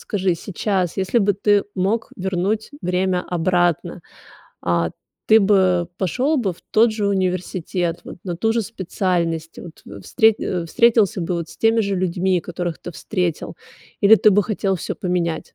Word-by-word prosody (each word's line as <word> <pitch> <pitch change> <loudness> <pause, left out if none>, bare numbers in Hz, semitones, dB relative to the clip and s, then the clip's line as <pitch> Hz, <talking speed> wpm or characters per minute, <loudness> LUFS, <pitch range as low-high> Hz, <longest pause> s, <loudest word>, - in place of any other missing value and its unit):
скажи 190 -4 -1
сейчас, 190 -1 -2
если 190 +5 +1
бы 205 -1 +2
ты 205 0 +2
мог 200 +5 -1
вернуть 190 +3 -2
время 180 0 0
обратно, 175 -1 0 0.6
а, 85 -2 0 0.4
ты 220 - +7
бы 185 -4 +3
пошел 255 - 0
бы 200 -7 -1
в - - -23
тот 220 +1 +4
же 210 -2 -1
университет, 180 -2 -2
вот - - -9
на 175 -2 -4
ту 225 +3 +1
же 230 - +1
специальность 175 -5 -2
вот, 165 - -11
в - - -10
встрет 220 -3 +3
э, 175 -2 -2
встретился 220 -1 +3
бы 170 +1 -2
вот 170 -1 -4
с - - -14
теми 225 0 +3
же 200 -2 -1
людьми, 180 0 0
которых 175 -1 -5
ты 175 - -8
встретил 180 -3 -3 0.5
или 210 +2 +8
ты 215 - +5
бы 205 +1 +4
хотел 195 -2 -1
всё - - -4
поменять? 170 -3 -2
185 Hz, 165 wpm, -21 LUFS, 175-205 Hz, 0.6 s, или